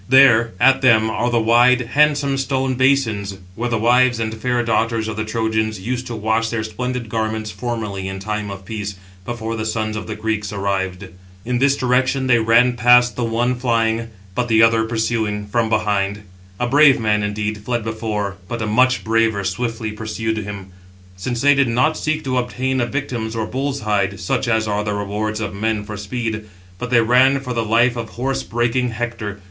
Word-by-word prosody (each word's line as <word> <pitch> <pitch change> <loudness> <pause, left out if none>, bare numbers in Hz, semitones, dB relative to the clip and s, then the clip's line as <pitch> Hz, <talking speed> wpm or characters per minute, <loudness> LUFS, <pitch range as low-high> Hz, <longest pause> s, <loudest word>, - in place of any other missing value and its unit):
There, 120 -4 +6
at 135 +1 +5
them, 110 -4 +4
are 120 +2 0
the 120 -1 +2
wide, 120 +3 +4
handsome 145 -1 +3
stone 135 -1 0
basins, 120 -7 +1 0.2
where 120 +5 -3
the 115 - 0
wives 120 +2 +3
and 110 -1 -2
fair 120 +2 -1
daughters 115 0 0
of 110 - -4
the 110 - -2
Trojans 110 -1 -1
used 125 +5 -4
to 120 - -5
wash 110 +1 0
their 110 -1 -2
splendid 125 +2 -4
garments 110 -1 -2
formerly 105 -3 -4
in 95 0 -5
time 105 +1 -4
of 95 -1 -8
peace, 105 -1 -5 0.3
before 115 -1 -4
the 110 - -3
sons 110 0 -2
of 105 - -5
the 110 - -4
Greeks 105 -2 -2
arrived. 95 -1 -2 0.4
In 125 0 -1
this 140 +1 +3
direction 130 +1 +1
they 125 -2 +4
ran 115 +2 +4
past 125 0 +5
[the 125 - -2
one] 120 +2 0
flying, 115 -2 0 0.3
but 125 +3 -1
the 110 -1 +4
other 115 0 +4
pursuing 110 -2 -1
from 110 +2 0
behind. 105 -2 0 0.4
A 125 - +1
brave 140 +1 +5
man, 105 -2 +1
indeed, 105 +1 -2
fled 120 +2 -2
before, 110 -3 -3
but 115 +1 -4
a - - -1
much 125 +4 +2
braver 110 -2 +1
swiftly 110 +3 -3
pursued 110 +1 -3
him; 100 -2 -6 0.5
since 120 +6 -3
they 145 0 +6
did 140 -2 +2
not 125 +7 +2
seek 155 0 -2
to 130 -1 0
obtain 130 +1 -1
a 120 - 0
victim 125 -4 -3
or 115 - -1
a - - -2
bull's 135 +4 -3
hide, 100 -2 0
such 95 - -1
as 110 -1 +1
are 105 0 -1
the 105 0 -2
rewards 105 +1 -3
of 105 -2 -4
men 105 +1 -1
for 105 +1 -7
speed, 110 +1 -4 0.3
but 125 - -4
they 120 -2 +4
ran 130 +4 +4
for 125 -2 -5
the 115 -1 -1
life 120 +3 +3
of 115 -2 -5
horse 135 +2 -1
breaking 120 +2 0
Hector. 115 -3 -5
115 Hz, 195 wpm, -20 LUFS, 105-125 Hz, 0.5 s, There